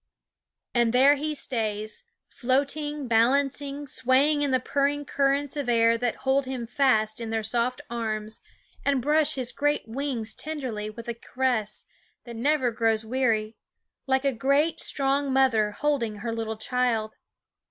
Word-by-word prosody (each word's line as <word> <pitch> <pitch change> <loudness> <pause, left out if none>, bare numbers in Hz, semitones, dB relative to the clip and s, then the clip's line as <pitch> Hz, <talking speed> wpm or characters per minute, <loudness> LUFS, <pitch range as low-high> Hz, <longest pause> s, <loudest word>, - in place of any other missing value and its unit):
And 240 -1 +2
there 270 +3 +6
he 300 +1 -3
stays, 220 - -3 0.2
floating, 285 +2 -1
balan 245 +5 +3
cing, 285 +1 -4
swaying 275 +4 +2
in 290 - +1
the 260 -1 +2
purring 285 +2 0
currents 280 +1 0
of 285 -4 -3
air 230 -1 +4
that 240 0 -1
hold 265 0 +2
him 255 -3 -4
fast 230 -3 +1
in 230 - -4
their 225 0 -1
soft 235 +3 0
arms 220 -2 -4 0.4
and 280 -2 +2
brush 300 +4 +2
his 255 -2 -1
great 290 -4 0
wings 235 -3 -3
tenderly 255 -9 -4
with 230 +2 -10
a 235 - -2
caress 235 -3 -2 0.4
that 235 -1 -9
never 260 +1 +1
grows 225 -1 0
weary, 225 -3 0 0.5
like 265 +1 +1
a 275 - +2
great, 280 +7 +1
strong 275 0 +1
mother 255 -6 +3
holding 235 -2 -1
her 225 +3 -4
little 220 -1 -3
child. 225 -2 -1
255 Hz, 150 wpm, -26 LUFS, 225-280 Hz, 0.5 s, there